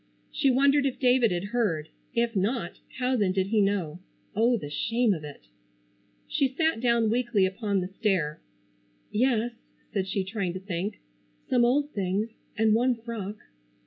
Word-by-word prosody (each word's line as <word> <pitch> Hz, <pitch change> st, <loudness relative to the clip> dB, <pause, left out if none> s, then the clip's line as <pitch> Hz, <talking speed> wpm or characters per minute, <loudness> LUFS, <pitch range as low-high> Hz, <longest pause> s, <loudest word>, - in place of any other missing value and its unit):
She 275 Hz, -, +2 dB
wondered 275 Hz, +2 st, +4 dB
if 260 Hz, -1 st, -3 dB
David 250 Hz, -3 st, +4 dB
had 180 Hz, +3 st, -2 dB
heard. 175 Hz, -11 st, 0 dB, 0.3 s
If 235 Hz, -1 st, +1 dB
not, 215 Hz, +6 st, -1 dB, 0.2 s
how 255 Hz, +1 st, +1 dB
then 200 Hz, -6 st, +2 dB
did 190 Hz, 0 st, 0 dB
he 220 Hz, -1 st, +3 dB
know? 185 Hz, -5 st, 0 dB, 0.4 s
Oh, 235 Hz, +3 st, +3 dB
the 145 Hz, -8 st, -7 dB
shame 230 Hz, +6 st, +1 dB
of 160 Hz, -4 st, -5 dB
it! 145 Hz, -1 st, -9 dB, 0.8 s
She 275 Hz, -, +2 dB
sat 315 Hz, +1 st, 0 dB
down 235 Hz, -3 st, +3 dB
weakly 235 Hz, -5 st, +2 dB
upon 200 Hz, 0 st, -1 dB
the 180 Hz, -, -3 dB
stair. 185 Hz, -6 st, -1 dB, 0.7 s
"Yes," 240 Hz, 0 st, +2 dB, 0.4 s
said 195 Hz, -3 st, 0 dB
she, 195 Hz, 0 st, -1 dB
trying 190 Hz, -2 st, -3 dB
to 185 Hz, -, -5 dB
think. 190 Hz, +2 st, -4 dB, 0.5 s
"Some 245 Hz, -2 st, +4 dB
old 285 Hz, +5 st, +2 dB
things, 200 Hz, +1 st, -1 dB, 0.3 s
and 220 Hz, 0 st, +4 dB
one 245 Hz, +3 st, +3 dB
frock." 225 Hz, -3 st, -6 dB
220 Hz, 160 wpm, -27 LUFS, 190-245 Hz, 0.8 s, wondered